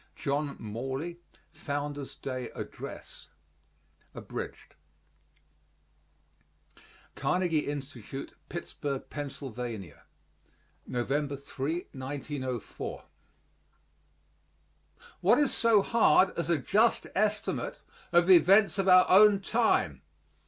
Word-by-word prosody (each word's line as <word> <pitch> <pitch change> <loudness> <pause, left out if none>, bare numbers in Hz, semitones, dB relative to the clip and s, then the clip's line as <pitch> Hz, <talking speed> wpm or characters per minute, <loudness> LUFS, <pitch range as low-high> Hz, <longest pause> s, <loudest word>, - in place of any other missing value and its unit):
JOHN 140 0 -2
MORLEY 135 +10 -5 0.3
FOUNDER'S 145 -1 -5
DAY 130 -2 -5
ADDRESS - - -8 0.9
(Abridged) - - -7 2.4
Carnegie 175 -4 0
Institute, 135 -2 -6 0.2
Pittsburgh, 145 -5 -5
Pa., 145 -1 -4 1.6
November 140 +4 -1
3, 140 +1 -4 0.2
1904. 130 -1 -5 2.2
What - - +4
is 290 -2 +3
so 225 -4 +4
hard 225 -4 +4
as 170 -1 -2
a 170 - +3
just 215 - +2
estimate 210 +1 -1 0.3
of 175 0 +5
the 185 -1 +9
events 195 +5 +4
of 195 - +1
our 185 -1 +7
own 205 +1 +7
time? 225 +4 +1
150 Hz, 80 wpm, -29 LUFS, 140-190 Hz, 2.4 s, the